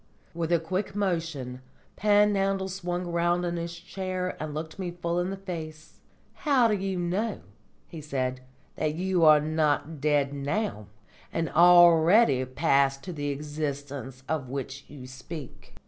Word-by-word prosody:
With 170 0 -3
a 170 - +5
quick 185 +5 -3
motion 165 -10 -2 0.3
Panhandle 200 -2 +2
swung 180 -1 -3
round 175 +1 +1
in 175 0 -2
his 170 0 -4
chair 185 +1 -4
and 155 0 -4
looked 160 +4 -6
me 185 -2 -2
full 170 0 -2
in 175 +1 -1
the 195 - -4
face. 160 -5 -8 0.3
"How 270 -6 +3
do 220 - +1
you 195 -2 -2
know," 190 +5 -2 0.5
he 165 - -9
said, 130 -3 -2 0.4
"that 155 -1 -1
you 180 0 +1
are 155 -1 +8
not 155 -1 0
dead 145 -2 +2
now, 140 - -2 0.4
and 165 -1 -1
already 175 - +6
passed 135 +2 +1
to 180 - -6
the 145 -2 -3
existence 140 -2 -5
of 145 -5 -2
which 135 +1 -5
you 135 -3 -11
speak?" 130 +2 -10
165 Hz, 145 wpm, -27 LUFS, 145-185 Hz, 0.5 s, are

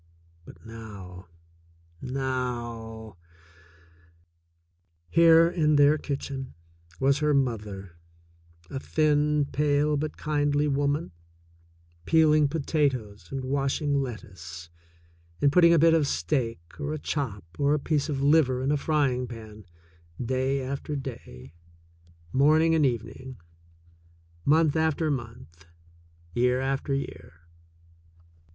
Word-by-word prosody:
But - - -15
now, 100 -5 -10 0.7
now! 120 -5 -4 1.9
Here, 165 0 +6
in 160 -3 +2
their 145 +1 +5
kitchen, 135 -2 -5 0.4
was 135 +2 +2
her 150 -1 +2
mother, 105 -9 -2 0.7
a 135 - -3
thin, 150 0 +1
pale, 150 +1 +1
but 150 +1 -4
kindly 145 -1 0
woman, 140 - 0 0.9
peeling 155 - +4
potatoes 135 - -2
and 135 -1 -4
washing 140 +1 0
let 125 -5 -5
tuce, 85 -5 -11 0.7
and 140 - +3
putting 170 +1 +6
a 170 - +5
bit 165 +1 +5
of 155 -3 +3
steak 115 - -1 0.2
or 150 +1 -3
a - - -6
chop 125 - -3 0.2
or 145 +1 +3
a - - -1
piece 150 0 -1
of 140 -2 -2
liver 140 -4 +3
in 135 - +1
a 150 - +2
frying 140 -4 0
pan 110 -3 -10 0.5
day 130 +2 -1
after 140 +3 -4
day, 80 - -8 0.8
morning 155 +4 +4
and 155 -3 +4
evening, 130 +2 -5 1.1
month 155 0 +3
after 160 0 +1
month, 115 - -7 0.7
year 125 +3 +2
after 135 +2 -2
year. 135 -11 -5
135 Hz, 110 wpm, -27 LUFS, 115-150 Hz, 1.9 s, Here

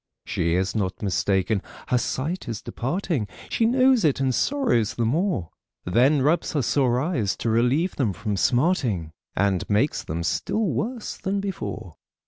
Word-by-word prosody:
She 85 0 0
is 95 +1 0
not 95 -1 -2
mistaken, 95 +1 +1 0.3
her 125 - +3
sight 145 +4 -3
is 110 -3 -3
departing; 140 - -2 0.2
She 225 - +2
knows 255 -1 +4
it 150 -4 +2
and 135 -1 +1
sorrows 240 - +1
the 115 - 0
more; 155 - 0 0.3
Then 130 +9 +3
rubs 155 +5 +1
her 145 -4 +1
sore 125 -1 +2
eyes, 130 - 0
to 115 - -1
relieve 125 +10 +2
them 120 -8 +1
from 105 +1 -3
smarting, 120 - +1 0.2
And 95 -2 +1
makes 110 +8 +2
them 85 +2 -4
still 215 - 0
worse 215 - -3
than 195 +1 -2
before. 105 - -5
125 Hz, 155 wpm, -24 LUFS, -, 0.3 s, knows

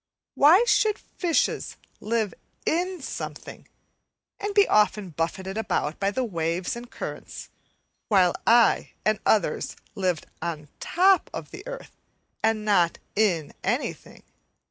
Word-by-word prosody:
Why 330 +10 +6
should 435 -3 +3
fishes 340 -3 -1 0.2
live 220 -2 -1 0.3
in 355 -1 -1
something - - -7 0.7
and 410 0 -3
be 405 -1 +6
often 210 -3 +2
buffeted 190 +6 -3
about 155 -8 -1
by 195 - +1
waves 180 -6 -2
and 240 0 -9
currents, - - -7 0.6
while 185 -4 +4
I 230 -2 +4
and 215 -1 +2
others 215 - +1 0.2
lived 185 -5 -1 0.2
on 165 -2 -3
the - - -19
top 375 +2 +3
of - - -7
the - - -8
earth - - -8 0.5
and 220 -1 +1
not 180 -5 +3 0.2
in 185 -8 +1
anything? - - -3
215 Hz, 120 wpm, -25 LUFS, -, 0.7 s, Why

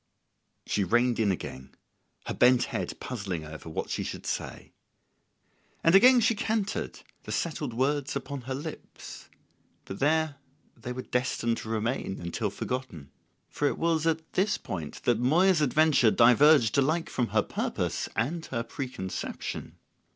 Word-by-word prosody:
She 100 - 0
reined 120 +4 +2
in 105 -3 +3
again, 65 -7 -6 0.5
her - - -3
bent 125 0 +5
head - - -3
puzzling 100 -10 -4
over 80 +1 -9
what 80 - -4
she - - -1
should - - -6
say. - - -5 1.1
And 165 - +5
again 245 +5 +7
she 230 - +3
cantered, 215 -1 -2 0.2
the - - -8
settled 155 -5 -2
words 140 +3 0
upon 140 0 -4
her 130 +2 -4
lips; 150 +3 -9 0.6
but 95 - -7
there 155 0 +1 0.4
they 125 - -7
were 130 +1 -5
destined 125 -2 -1
to 110 - -7
remain 110 -2 -2
until 95 +5 -2
forgotten; 100 - -5 0.4
for 145 - -1
it - - -1
was 165 -1 +1
at 160 0 -1
this 205 +3 +1
point 80 -5 -6
that 120 -2 +2
Moya's 165 +7 +4
adventure 150 -3 +4
diverged 125 +1 +5
alike 155 +5 +1
from 120 -2 -1
her - - +1
purpose - - -2
and 155 +10 -1
her 115 -2 -2
preconception. 115 -6 -5
130 Hz, 145 wpm, -28 LUFS, 115-155 Hz, 1.1 s, again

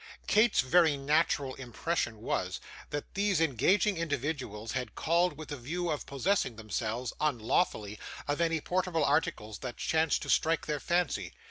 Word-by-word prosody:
Kate's 215 +2 +4
very 160 +2 +4
natural 140 -1 +1
impression 120 -2 -3
was, - - -1 0.3
that 145 - -5
these 200 -3 +2
engaging 170 - +3
individuals 140 -8 -3
had 130 -1 -3
called 170 -1 +2
with 155 -1 -8
the 145 - -3
view 165 +7 -3
of 150 - -3
possessing 140 - 0
themselves, 110 +2 -3
unlawfully, 115 - 0 0.3
of 145 +3 0
any 165 -1 +2
portable 175 -2 0
articles 140 - 0
that 125 -2 -6
chanced 160 -1 +1
to - - -7
strike 165 +1 +2
their 150 -1 -1
fancy. 175 +1 0
150 Hz, 145 wpm, -31 LUFS, 125-170 Hz, 0.3 s, Kate's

